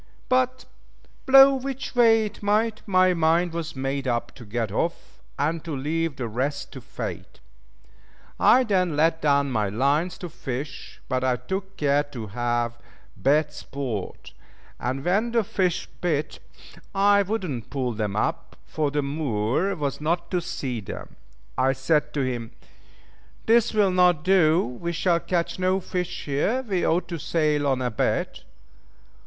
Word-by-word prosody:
But, 255 0 +1 0.6
blow 270 +1 +9
which 270 0 -4
way 225 -2 +5
it 210 0 -8
might, 215 +2 +1
my 185 -1 +4
mind 165 +1 +2
was 165 -2 -4
made 135 +1 -2
up 120 0 -1
to 120 - -12
get 110 0 -2
off, 165 +11 -3 0.2
and 155 +3 -1
to 160 -3 -4
leave 155 +3 -1
the 125 -3 -4
rest 135 +6 -3
to 130 - -9
fate. - - -7 1.0
I 255 +2 +6
then 185 -8 +1
let 160 +2 +2
down 140 -2 +2
my 110 -4 0
lines 140 - +1
to 180 - -6
fish, 135 -3 -6
but 130 -1 -1
I 130 -1 +2
took 190 +7 -5
care 145 -1 +3
to 140 -6 -7
have 120 +2 -2 0.4
bad 150 +2 +2
sport; 135 -9 -6 0.5
and 130 +3 -3
when 210 +6 +1
the 230 -2 +3
fish 190 -5 -1 0.2
bit, 150 -4 -1 0.6
I 200 +1 +5
would 205 +2 -2
not 125 -7 -5
pull 130 -3 -2
them 105 -2 -2
up, 165 +9 -2
for 150 -2 -1
the 145 0 -1
Moor 140 - -1
was 145 -3 -3
not 170 +3 -1
to 180 -2 +1
see 130 -7 -4
them. 95 - -8 0.4
I 130 +1 +3
said 150 +3 +1
to 145 - +1
him, 120 -3 -3 0.9
"This 235 +1 +4
will 205 -3 +3
not 180 -3 +3
do, 180 -2 +4
we 170 +8 -5
shall 170 +1 +2
catch 170 0 -2
no 185 +1 +2
fish 180 -1 -4
here, 175 - 0
we 195 -7 -1
ought 170 +1 +1
to 170 -2 -4
sail 150 -2 +1
on 130 -2 +1
a 125 - -1
bit." 110 - -1
155 Hz, 160 wpm, -25 LUFS, 130-185 Hz, 1.0 s, blow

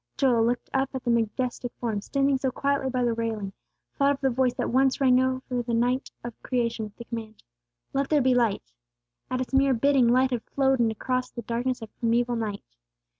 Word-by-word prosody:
Joel, 240 -4 +3
looking 240 +1 -2
up 270 0 +1
at 260 - -4
the 240 - +1
majestic 240 +2 -1
form, 220 -4 -2
standing 275 +3 +1
so 265 - 0
quietly 275 +1 -1
by 255 -1 0
the 240 -1 +1
railing, 220 -4 -3 0.4
thought 280 0 +3
of 275 - -8
the 265 -1 +2
voice 250 0 +1
that - - -2
once 265 +2 +3
rang 255 -2 +5
out 260 0 -1
over 245 -1 0
the 235 -1 -2
night 245 +3 0
of 240 -1 -6
Creation 235 -3 -1
with 210 -1 -12
the 235 - -8
command, 225 -2 -7 0.5
"Let 275 0 0
there 300 - +4
be 260 -1 +3
light!" 225 - 0 0.6
At 255 0 -1
its 255 - -5
mere 270 -1 +4
bidding 270 0 +3
light 255 +2 +3
had 245 -2 -1
flowed 270 -1 +3
in 235 -1 +3
across 255 +3 -2
the 235 - -7
darkness 240 +1 -2
of 220 - -11
primeval 240 +1 +1
night. 215 -3 -3
245 Hz, 215 wpm, -26 LUFS, 230-265 Hz, 0.6 s, rang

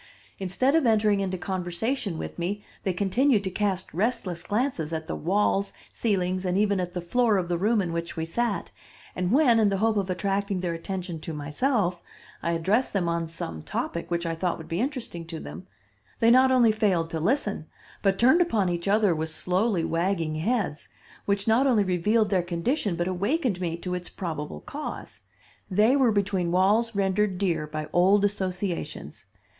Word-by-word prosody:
Instead 195 +9 +1
of 320 -6 +3
entering 210 -2 +3
into 190 -1 -2
conversation 190 +3 -2
with - - -6
me 200 +4 -2 0.2
they 190 - 0
continued 205 +5 +2
to 190 - -3
cast 190 -1 -2
restless 185 -3 -1
glances 205 - -1
at 160 -1 -3
the - - -4
walls, 200 +3 +1 0.2
ceilings, 185 -4 0
and 180 0 0
even 200 -1 +2
at 180 -1 -3
the 180 - -2
floor 220 +4 +2
of 180 -2 -1
the 175 0 0
room 210 +2 +2
in 170 -2 -3
which 170 0 -4
we 160 - -1
sat, 225 +6 -2 0.4
and 180 0 -1
when, 250 -4 +5
in 210 -2 +4
the 195 - 0
hope 220 +1 +2
of 195 -2 -1
attracting 195 +1 -1
their 175 -2 -1
attention 175 0 -5
to 160 +1 -6
myself, 175 - 0 0.4
I 170 - 0
addressed 195 +10 +1
them 190 -4 0
on 170 0 -1
some 80 - -5
topic 170 - -4
which 170 0 -1
I 165 - -1
thought 175 +2 -1
would 160 - -10
be 165 +1 -2
interesting 250 - -4
to 165 -1 -6
them, 80 - -9 0.5
they 230 0 +5
not 260 +1 +6
only 245 -3 +5
failed 190 -7 +1
to 160 - -2
listen, 205 - 0 0.3
but 195 -1 +2
turned 260 - +5
upon 220 - +2
each 175 +1 -3
other 205 -2 +3
with 160 0 -2
slowly 180 +4 +1
wagging 165 -1 0
heads, 180 -1 -1 0.4
which 200 0 0
not 235 +5 +4
only 230 -6 +4
revealed 205 +4 +1
their 190 -2 +3
condition 180 - -1
but 175 +1 -1
awakened 200 - 0
me 170 -2 -2
to 180 +1 -5
its 180 -1 -4
probable 155 -5 -5
cause. 300 +2 -7 0.5
They 210 +7 +4
were 260 -5 +4
between 195 -4 0
walls 210 +5 +2
rendered 195 0 +1
dear 175 -5 0
by 155 0 -5
old 195 +3 +4
associations. 190 -2 -3
190 Hz, 185 wpm, -26 LUFS, 170-215 Hz, 0.5 s, not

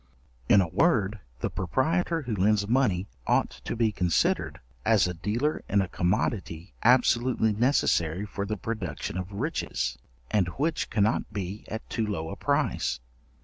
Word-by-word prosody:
In 100 - +7
a 90 - 0
word, 110 - +2 0.2
the - - 0
proprietor 160 - 0
who 120 -4 -2
lends 100 +1 +2
money 110 -7 +2 0.2
ought - - +2
to - - -2
be 115 -2 +2
considered, 90 -4 +1 0.2
as - - +4
a 90 - -2
dealer 115 - -1
in 100 - +3
a 95 - +1
commodity 90 -1 -1
absolutely 120 -2 +3
necessary 100 - +2
for 100 -1 -4
the 105 0 -2
production 90 -8 -4
of 90 +1 -4
riches, 70 - -2 0.3
and 100 -5 +2
which 160 +4 0
cannot 105 +1 +1
be 100 0 -5
at 110 - -6
too 115 -2 -2
low 80 -6 -3
a - - -5
price. 70 +2 0
105 Hz, 150 wpm, -27 LUFS, 90-120 Hz, 0.3 s, In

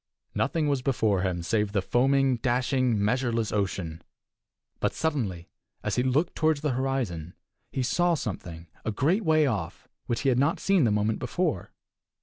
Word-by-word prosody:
Nothing 150 +2 0
was 140 -3 +1
before 110 -8 +1
him 90 -2 -1
save 105 +2 0
the 100 - +2
foaming, 135 +3 +2
dashing, 125 -2 +1
measureless 115 -2 0
ocean. 90 -5 -2 0.8
But - - 0
suddenly, 110 - -2 0.3
as 105 - -1
he 125 - +2
looked 135 +7 +1
toward 155 -1 +2
the 150 0 -1
horizon, 120 -11 -2 0.4
he 130 - -1
saw 175 +6 +2
something, 85 - -5 0.2
a 110 - -1
great 165 - +1
way 155 -3 +4
off, 100 - -3 0.2
which 115 - -1
he 135 - +2
had 125 -1 +2
not 145 +5 +2
seen 195 -8 +3
the 110 - +2
moment 105 +1 +1
before. - - -1
125 Hz, 160 wpm, -27 LUFS, 105-140 Hz, 0.8 s, way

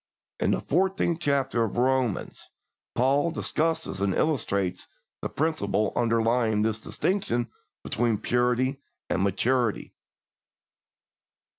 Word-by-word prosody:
In - - +1
the - - +1
fourteenth 180 0 +1
chapter 135 -5 +1
of 110 -1 -3
Romans, 130 -3 0 0.5
Paul 140 +6 +3
discusses 160 - -1
and 100 -2 +1
illustrates 100 - 0 0.3
the - - -3
principle 130 -9 0
underlying 115 -2 +2
this 110 0 0
distinction 120 - -1 0.3
between 115 -2 0
purity 125 +4 +1 0.3
and 95 - +1
maturity. 115 +4 0
120 Hz, 100 wpm, -26 LUFS, 110-140 Hz, 0.5 s, Paul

